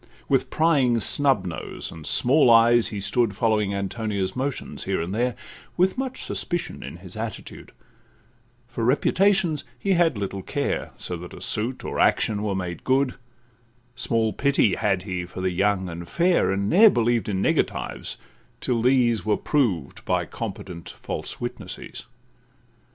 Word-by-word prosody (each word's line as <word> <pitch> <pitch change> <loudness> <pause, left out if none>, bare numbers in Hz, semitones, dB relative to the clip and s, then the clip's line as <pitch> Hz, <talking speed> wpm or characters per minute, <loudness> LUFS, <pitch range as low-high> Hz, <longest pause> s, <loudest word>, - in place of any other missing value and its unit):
With - - +1
prying 140 -7 +3
snub 135 -4 +2
nose, 85 -3 -6
and 80 -2 -9
small 130 +1 +4
eyes, 115 0 +6
he 105 - -5
stood, 110 +1 0
Following 105 -2 +1
Antonia's 100 -1 -2
motions 135 +1 -4
here - - 0
and 85 +3 -3
there, 120 +3 0 0.4
With 185 +1 +3
much 260 0 -3
suspicion 175 -1 -3
in - - -8
his - - -11
attitude; - - -7 1.0
For 120 - -4
reputations 175 - +2
he 195 - -1
had 170 - +3
little 100 -1 -4
care; - - -2
So 90 - -4
that 90 +1 -9
a - - -10
suit 120 +4 -1
or - - -3
action 105 -2 +2
were 105 -2 -1
made 90 -2 -4
good, 130 0 +2 0.8
Small 115 -3 0
pity 140 -8 +2
had 95 -3 0
he 90 -3 -3
for 90 - -9
the 95 0 0
young 95 +1 +1
and 85 0 -7
fair, 175 - +2
And 100 +1 -1
ne'er 210 - +7
believed 120 - +1
in 95 -2 -1
negatives, - - -1 0.4
till 120 -2 0
these 120 -4 +3
Were 105 -1 +1
proved 110 - -1
by - - 0
competent 85 -2 -7
false - - -5
witnesses. - - -7
115 Hz, 150 wpm, -24 LUFS, 95-135 Hz, 1.0 s, ne'er